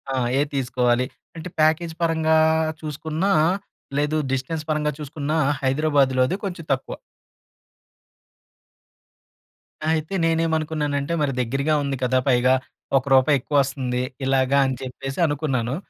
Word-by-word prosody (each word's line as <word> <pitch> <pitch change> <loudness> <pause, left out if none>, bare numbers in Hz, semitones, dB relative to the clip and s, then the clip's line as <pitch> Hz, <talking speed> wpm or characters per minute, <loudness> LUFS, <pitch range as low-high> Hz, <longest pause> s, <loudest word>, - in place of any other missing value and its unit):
ఆ! - - -1 0.2
ఏది 145 0 0
తీసుకోవాలి. 125 -2 +1 0.3
అంటే 165 +2 -7
ప్యాకేజ్ 160 +2 +2
పరంగా 160 -1 +2 0.4
చూసుకున్నా, 155 +5 -2 0.7
లేదు 150 +2 +1
డిస్టెన్స్ 135 +4 -2
పరంగా 150 -1 +1
చూసుకున్నా 150 +1 -3 0.3
హైదరాబాద్‌లోది 135 0 +2
కొంచెం 180 -4 -5
తక్కువ. 130 - -5 2.9
అయితే 160 +2 -1
నేనేమనుకున్నానంటే. 160 -2 0
మరి 140 -2 +1
దగ్గరగా 135 +5 0
ఉంది 140 -1 -2
కదా! 130 +1 +2
పైగా 130 0 +4 0.4
ఒక్క 135 - -2
రూపాయి 135 +2 +4
ఎక్కువొస్తుంది. 130 -2 0 0.2
ఇలాగా 135 +1 +2
అని 130 -1 -1
చెప్పేసి 135 +2 -6
అనుకున్నాను. 135 -5 -1
145 Hz, 105 wpm, -23 LUFS, 130-155 Hz, 2.9 s, పైగా